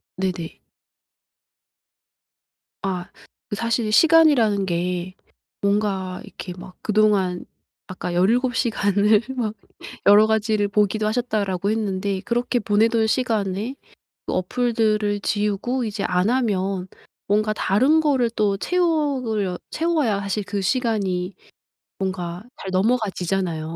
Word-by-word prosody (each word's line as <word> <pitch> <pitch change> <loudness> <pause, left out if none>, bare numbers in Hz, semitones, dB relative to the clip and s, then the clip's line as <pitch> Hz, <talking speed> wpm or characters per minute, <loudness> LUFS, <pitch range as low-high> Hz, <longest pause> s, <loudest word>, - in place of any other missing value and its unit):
네네. 180 -3 -4 2.2
아. 185 -2 -3 0.4
그 - - -2
사실 230 0 -1
시간이라는 265 -8 +5
게 180 +1 -2 0.5
뭔가 200 -2 -1
이렇게 180 - -8
막 180 0 -11
그동안 205 -4 +1 0.4
아까 185 -1 -5
17 235 +8 +2
시간을 210 -2 +2
막 220 -4 -2 0.5
여러 205 +1 +7
가지를 215 -1 +1
보기도 210 +1 +1
하셨다라고 210 -4 -1
했는데 200 -3 -1
그렇게 240 +1 0
보내던 220 +1 +2
시간에 220 -1 -1 0.5
그 - - -2
어플들을 215 0 0
지우고 210 +5 -1
이제 205 -1 -3
안 180 +3 +1
하면 195 -7 0 0.4
뭔가 215 +1 +2
다른 260 +12 +3
거를 270 -6 +2
또 205 -3 0
채우려 270 - 0
채워야 305 -11 0
사실 200 +1 -2
그 200 +1 -3
시간이 195 -5 0 0.6
뭔가 185 -1 -4 0.2
잘 190 - -5
넘어가지잖아요. 185 -6 -1
210 Hz, 235 characters per minute, -22 LUFS, 190-230 Hz, 2.2 s, 여러